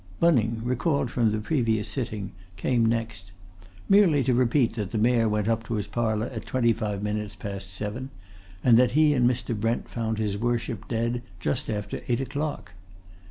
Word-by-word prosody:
Bunning, 115 -9 +3
recalled 130 +2 0
from 115 -3 +2
the 110 - 0
previous 110 -3 0
sitting, 110 -7 -4 0.3
came 120 +4 +1
next 110 -5 -2 0.6
merely 185 -9 +5
to 125 0 +2
repeat 125 +1 +2
that 105 -5 -3
the 110 - -3
Mayor 115 0 +3
went 105 0 0
up 115 0 +1
to 115 - -2
his 105 - -2
parlour 110 -2 -1
at 110 -5 -7
twenty 120 -3 +2
five 105 -3 -3
minutes 105 0 -3
past 100 -1 -6
seven, 105 +7 -5 0.5
and 120 -2 +6
that 125 -1 +3
he 155 -1 +5
and 125 -3 +4
Mr. 120 -1 -2
Brent 115 +3 -1
found 110 -2 -2
his 105 -2 -1
Worship 115 -2 -2
dead 115 +1 -1 0.2
just 75 -5 -2
after 105 -1 -3
eight 120 -1 +1
o'clock. 140 -7 -4
115 Hz, 175 wpm, -26 LUFS, 105-125 Hz, 0.6 s, and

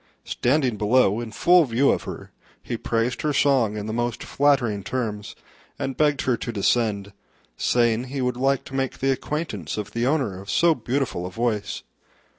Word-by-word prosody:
Standing 130 -3 +1
below 105 0 +3
in 115 -2 -6
full 175 +8 +5
view 130 +2 +3
of - - -2
her, - - -8 0.3
he - - -3
praised 115 +2 -1
her 150 -1 0
song 130 -7 +2
in 105 - -4
the 110 - -4
most 120 0 -2
flattering 130 -8 +1
terms, 105 -2 -4 0.4
and 135 - -3
begged 145 -2 +2
her 125 - +2
to 120 - -5
descend, 100 -2 0 0.4
saying 120 0 +1
he 135 +2 -5
would 125 -1 0
like 135 +1 +1
to - - -12
make 135 -1 -2
the 135 0 +1
acquaintance 130 - -3
of 105 -1 -4
the 115 +2 -1
owner 130 -11 0
of 100 - -12
so 170 +7 +4
beautiful 125 - -2
a - - -6
voice. 105 0 -2
120 Hz, 180 wpm, -24 LUFS, 105-135 Hz, 0.4 s, full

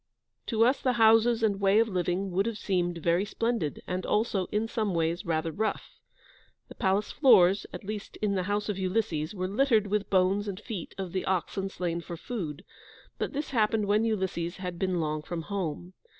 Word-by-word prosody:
To 225 -1 +3
us 255 +3 +2
the 255 - +2
houses 225 0 +5
and 200 -3 +2
way 195 +1 +4
of 225 +1 +4
living 185 0 -1
would 195 +4 +1
have 230 -2 -3
seemed 175 -4 -1
very 170 +3 +1
splendid, 225 - -2
and 180 0 -3
also, 210 -4 0
in 215 +2 -1
some 215 -5 -1
ways, 165 +1 -1
rather 160 0 0
rough. 215 +7 -3 0.7
The - - -9
palace 195 0 0
floors, 195 - +5
at - - -8
least 205 0 -6
in 210 -2 0
the 190 - 0
house 205 0 0
of 205 -2 -2
Ulysses, 185 -4 -1
were 185 -1 -2
littered 220 +1 +3
with 205 0 -1
bones 195 +2 +2
and 195 -1 -4
feet 220 -6 -7
of 190 -3 -4
the 185 - -2
oxen 190 +1 -1
slain 175 -3 -3
for 170 0 -7
food, 165 -9 -5 0.5
but - - -2
this 290 +1 -3
happened 220 -3 +2
when 210 +2 +2
Ulysses 190 -6 -1
had 180 -2 -5
been 185 -2 0
long 155 -1 -1
from 165 +2 -5
home. 180 -2 -4
195 Hz, 195 wpm, -28 LUFS, 175-215 Hz, 0.7 s, houses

